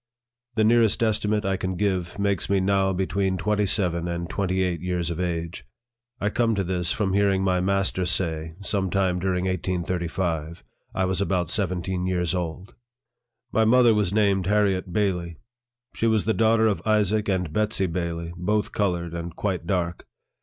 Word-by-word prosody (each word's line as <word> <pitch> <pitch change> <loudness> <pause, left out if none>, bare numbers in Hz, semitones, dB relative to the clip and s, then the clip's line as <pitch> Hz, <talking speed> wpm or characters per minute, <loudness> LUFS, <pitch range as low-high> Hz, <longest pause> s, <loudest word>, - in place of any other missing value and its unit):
The 110 - +3
nearest 115 0 +3
estimate 105 -1 +1
I 95 0 0
can 95 0 -3
give 95 -3 -1
makes 100 -2 -1
me 100 -1 +3
now 95 0 +2
between 95 0 0
twenty 105 +1 0
seven 90 -4 0
and 85 0 -3
twenty 95 0 -1
eight 85 -3 -2
years 90 -2 -2
of 85 - -4
age. 85 -1 -3 0.6
I 105 +1 0
come 115 -1 +1
to 100 - 0
this, 90 -1 -1
from 95 -3 0
hearing 100 -1 +2
my 90 -1 +2
master 95 -1 0
say, 80 -3 -1
some 100 -1 -1
time 95 -1 +1
during 90 0 -1
1835, 85 -3 -2 0.3
1 95 0 0
was 95 +1 -1
about 90 -3 0
seven 90 -4 0
teen 90 0 -2
years 90 -3 0
old. 90 +4 -4 0.8
My 110 - +3
mother 120 +1 +5
was 105 -4 +1
named 100 -3 +2
Harriet 100 -3 +1
Bailey. 90 -4 -1 0.6
She 115 - 0
was 110 -2 +2
the 110 - +2
daughter 110 0 +3
of 105 -3 +1
Isaac 105 -1 +1
and 90 -5 -1
Betsey 105 -1 +1
Bailey, 85 -1 -3
both 105 +5 -1
colored, 85 -4 -1
and 85 0 -5
quite 90 -5 -2
dark. 90 -2 -2
95 Hz, 170 wpm, -25 LUFS, 90-100 Hz, 0.8 s, mother